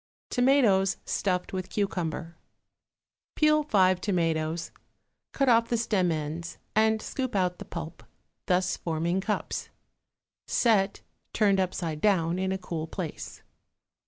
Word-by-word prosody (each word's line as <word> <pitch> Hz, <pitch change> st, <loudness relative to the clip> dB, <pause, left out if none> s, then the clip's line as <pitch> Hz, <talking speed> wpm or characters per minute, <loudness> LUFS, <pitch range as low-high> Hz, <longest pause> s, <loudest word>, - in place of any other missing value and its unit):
=Tomatoes 235 Hz, -8 st, +3 dB
Stuffed 180 Hz, -2 st, -1 dB
with 185 Hz, -1 st, -3 dB
Cucumber.= 170 Hz, -4 st, -2 dB, 1.0 s
Peel 305 Hz, 0 st, +4 dB
five 185 Hz, -10 st, +3 dB
tomatoes, 165 Hz, -3 st, -1 dB, 0.6 s
cut 275 Hz, -, 0 dB
off 230 Hz, -1 st, +4 dB
the 235 Hz, -, +1 dB
stem 205 Hz, -6 st, +1 dB
ends 160 Hz, +2 st, -4 dB, 0.2 s
and 220 Hz, 0 st, +3 dB
scoop 260 Hz, 0 st, -4 dB
out 180 Hz, -2 st, +1 dB
the -, -, -7 dB
pulp, 170 Hz, -1 st, -7 dB, 0.5 s
thus 180 Hz, 0 st, +2 dB
forming 170 Hz, +3 st, -1 dB
cups; 210 Hz, +2 st, -3 dB, 0.8 s
set, 205 Hz, -5 st, +2 dB, 0.3 s
turned 200 Hz, -3 st, +3 dB
upside 170 Hz, -4 st, -2 dB
down, 180 Hz, -4 st, +2 dB
in 190 Hz, 0 st, 0 dB
a 190 Hz, -, 0 dB
cool 165 Hz, -3 st, -5 dB
place. 165 Hz, -2 st, -6 dB
185 Hz, 120 wpm, -28 LUFS, 170-215 Hz, 1.0 s, Peel